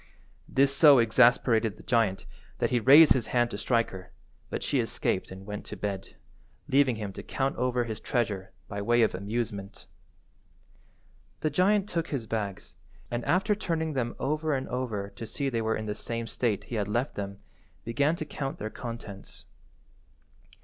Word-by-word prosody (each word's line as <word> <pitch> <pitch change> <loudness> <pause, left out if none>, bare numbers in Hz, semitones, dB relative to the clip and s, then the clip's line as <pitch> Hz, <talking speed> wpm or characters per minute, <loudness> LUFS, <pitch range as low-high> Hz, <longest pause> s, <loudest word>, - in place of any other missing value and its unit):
This 140 +1 +3
so 145 -3 +8
exasperated 115 -1 +4
the - - -14
giant 110 -5 +1 0.3
that - - 0
he 125 - +3
raised 145 +7 +8
his 125 -4 -1
hand 120 -1 +1
to 100 - -4
strike 115 +1 +1
her, 95 -1 -10 0.4
but - - -4
she - - +1
escaped - - -1
and 95 +1 -10
went 105 0 -6
to - - -7
bed, 100 -2 -4 0.5
leaving 135 -2 +3
him 105 -3 -5
to - - -7
count 135 0 -2
over 125 -1 +1
his 110 -2 -5
treasure 100 -6 -2 0.2
by 100 0 -4
way 120 +3 +3
of 110 - +2
amusement. 100 0 -4 1.6
The 155 - 0
giant 195 +6 +3
took 165 -4 -2
his 130 -6 -3
bags, 105 -3 -4 0.3
and 120 0 -2
after 195 +4 +2
turning 165 -6 -2
them 120 -3 -2
over 155 +1 0
and 130 - -3
over 110 -6 -3
to 115 - -8
see 140 +5 -2
they 115 -3 -1
were 110 0 0
in 110 - -5
the 105 - -2
same 115 +2 -4
state 115 -2 -1
he 120 - -6
had 100 - -3
left 120 +6 -1
them, 100 -1 -5 0.5
began 145 +7 +1
to 155 - -5
count 135 -2 -4
their 110 +1 -5
contents. 115 -5 -8
120 Hz, 175 wpm, -28 LUFS, 105-135 Hz, 1.6 s, so